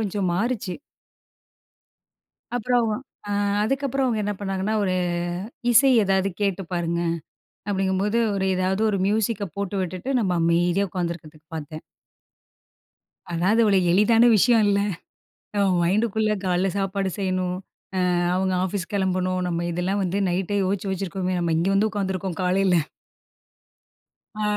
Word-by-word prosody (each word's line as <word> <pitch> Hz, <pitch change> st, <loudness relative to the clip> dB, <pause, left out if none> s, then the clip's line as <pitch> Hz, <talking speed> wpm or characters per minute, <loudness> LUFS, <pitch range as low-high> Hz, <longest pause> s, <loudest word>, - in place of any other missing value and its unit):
கொஞ்சம் 200 Hz, -3 st, -1 dB
மாறிச்சு. 205 Hz, -2 st, -1 dB, 1.8 s
அப்புறம் 245 Hz, -1 st, +1 dB, 0.4 s
அ -, -, -3 dB, 0.3 s
அதுக்கப்பறம் 270 Hz, +2 st, 0 dB
அவங்க 225 Hz, -3 st, 0 dB
என்ன 205 Hz, -, -1 dB
பண்ணாங்கன்னா, 195 Hz, +2 st, -2 dB
"ஒரு 185 Hz, -2 st, 0 dB, 0.8 s
இசை 240 Hz, +4 st, +6 dB
ஏதாவது 195 Hz, 0 st, +2 dB
கேட்டு 195 Hz, -1 st, 0 dB
பாருங்க." 170 Hz, -1 st, -1 dB, 0.7 s
அப்படிங்கும்போது 195 Hz, +2 st, 0 dB, 0.2 s
ஒரு 190 Hz, -1 st, 0 dB
ஏதாவது 185 Hz, +3 st, 0 dB
ஒரு 200 Hz, -, -1 dB
மியூசிக்க 215 Hz, 0 st, 0 dB
போட்டு 200 Hz, 0 st, -3 dB
விட்டுட்டு 185 Hz, +8 st, -4 dB
நம்ம 190 Hz, -5 st, 0 dB
அமைதியா 175 Hz, +4 st, +2 dB
உட்காந்துக்கிறதுக்கு 170 Hz, -4 st, -5 dB
பாத்தேன். 155 Hz, +1 st, -7 dB, 1.5 s
அதாவது, 185 Hz, +7 st, +2 dB
அவ்ள 205 Hz, -2 st, +4 dB, 0.2 s
எளிதான 225 Hz, +4 st, +5 dB
விஷயம் 230 Hz, +1 st, +4 dB
இல்ல. 200 Hz, 0 st, +2 dB, 0.8 s
நம்ம 200 Hz, -1 st, +3 dB
மைண்டுக்குள்ள 215 Hz, +3 st, +1 dB
கால்ல 180 Hz, +1 st, +1 dB
சாப்பாடு 195 Hz, 0 st, -1 dB
செய்யணும், 185 Hz, -2 st, -1 dB, 0.6 s
அ -, -, +1 dB, 0.2 s
அவங்க 190 Hz, 0 st, 0 dB
ஆஃபீஸ் 190 Hz, 0 st, -3 dB
கிளம்பணும், 185 Hz, -2 st, 0 dB
நம்ம 170 Hz, 0 st, -2 dB
இதெல்லாம் 180 Hz, +4 st, -1 dB
வந்து 190 Hz, +3 st, -1 dB
நைட்டே 190 Hz, +3 st, -1 dB
யோச்சு 195 Hz, +1 st, -1 dB
வச்சிருக்கோமே 185 Hz, -1 st, -2 dB
நம்ம 170 Hz, -2 st, 0 dB
இங்க 170 Hz, +4 st, +1 dB
வந்து 210 Hz, +2 st, +2 dB
உட்காந்துருக்கோம், 190 Hz, -4 st, -3 dB
காலைல. 185 Hz, 0 st, +2 dB, 1.6 s
அ. 215 Hz, -, -4 dB
195 Hz, 120 wpm, -24 LUFS, 180-210 Hz, 1.8 s, இசை